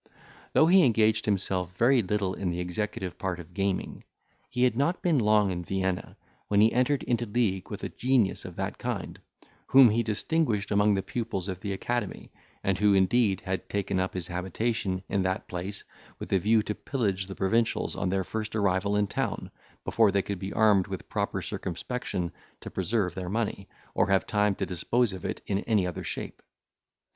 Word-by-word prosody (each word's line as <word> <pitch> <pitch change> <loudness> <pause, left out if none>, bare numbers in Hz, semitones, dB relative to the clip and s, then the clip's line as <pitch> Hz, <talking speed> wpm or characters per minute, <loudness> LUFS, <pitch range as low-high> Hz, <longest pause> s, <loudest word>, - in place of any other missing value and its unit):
— - - -24
Though 155 - +7
he 180 +2 +6
engaged 110 -4 +3
himself 95 -3 -1
very 125 +1 +5
little 100 -1 -1
in 95 -2 -2
the 85 0 -2
executive 90 0 -3
part 90 -2 -2
of 85 - -11
gaming, 100 -1 -2 0.5
he 125 - 0
had 125 -3 +3
not 145 +8 0
been 165 -6 +3
long 105 -3 +3
in 90 -1 -3
Vienna, 95 0 -2 0.3
when 100 - +2
he 110 +2 +5
entered 130 +3 +2
into 120 -1 0
league 100 -4 0
with - - -6
a - - -2
genius 125 -6 +1
of - - -8
that - - -4
kind, - - -4 0.5
whom 130 -4 +8
he 115 +2 +2
distinguished 110 0 0
among 105 0 +4
the 95 - -1
pupils 110 -6 -3
of 95 -2 -4
the 100 +1 -4
academy, 110 +3 -3 0.3
and 95 -1 0
who 105 -1 +4
indeed 95 +1 +3
had 95 0 -4
taken 100 -2 -1
up 95 0 -2
his 90 -3 -3
habitation 95 +2 -2
in 100 - 0
that 95 0 -1
place 95 +3 -5 0.3
with - - -5
a 95 - +4
view 110 +3 +3
to 105 - -2
pillage 100 -8 -2
the 95 - -7
provincials 110 +4 +1
on - - -1
their 95 +1 0
first 110 +3 -4
arrival 100 -1 +1
in 105 0 +3
town, - - -3 0.3
before 110 -3 +4
they 100 0 +1
could 100 -2 -4
be 95 0 -5
armed 105 -4 +4
with 95 -1 -7
proper - - -2
circumspection 90 -1 -3 0.3
to - - -9
preserve 95 -1 0
their 90 -1 -5
money, 105 -2 -2 0.2
or - - +2
have 95 -1 +3
time 105 -2 +1
to - - -2
dispose 115 +5 0
of 95 - -7
it - - -3
in 100 - 0
any 105 -3 +1
other 90 - -4
shape. - - -5
100 Hz, 190 wpm, -28 LUFS, 95-115 Hz, 0.5 s, whom